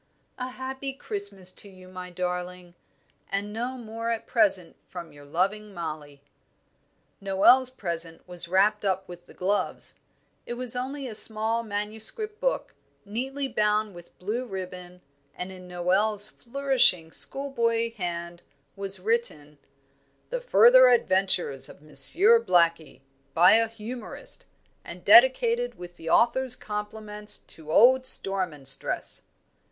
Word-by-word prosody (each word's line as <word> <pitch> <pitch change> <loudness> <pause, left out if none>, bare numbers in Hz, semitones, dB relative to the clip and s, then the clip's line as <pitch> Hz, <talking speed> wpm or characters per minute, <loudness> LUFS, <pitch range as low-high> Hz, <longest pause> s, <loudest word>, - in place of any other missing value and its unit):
A 250 - -3
happy 265 +1 -6
Christmas 200 -6 -5
to 200 - -13
you, 185 -1 -16
my 185 0 -9
darling! 180 0 -5 0.6
and 205 +1 -3
no 245 +4 -4
more 230 -1 -6
at 230 -1 -3
present 195 -6 +2
from 170 -4 -9
your 145 0 -15
loving 195 +7 -2
Mollie." 150 -4 -7 1.0
Noel's 200 +7 +4
present 170 -9 -5
was 175 -1 -4
wrapped 200 +4 +2
up 190 -1 -1
with 175 0 -12
the - - -15
gloves; 200 +3 -2 0.5
it 240 - -4
was 250 0 -3
only 265 +2 -4
a 230 - -7
small 220 +2 +3
manuscript 220 - -3
book, - - -2 0.3
neatly 265 +7 -4
bound 210 -3 0
with 175 -1 -15
blue 215 +7 -3
ribbon, 180 -4 -8 0.3
and 180 +1 -6
in 185 -1 -12
Noel's 195 +4 +2
flourishing 240 -10 +1
school 275 +9 -3
boy 230 -2 0
hand 175 -4 -6 0.3
was 195 -1 -5
written, 180 -9 -3 0.7
"The - - -3
further 255 - +6
adventures 190 - +1
of - - -15
Monsieur 395 - +6
Blackie, 170 - +1 0.3
by 175 +2 +6
a 225 +1 +4
Humourist, 230 - -8 0.4
and - - -11
dedicated - - +5
with 175 0 -11
the 165 - -7
author's 255 +4 +2
compliments 210 0 -3
to 155 -1 -12
old 260 +7 +5
Storm 195 -6 +2
and 140 -3 -9
Stress." 135 0 +1
205 Hz, 130 wpm, -26 LUFS, 180-240 Hz, 1.0 s, further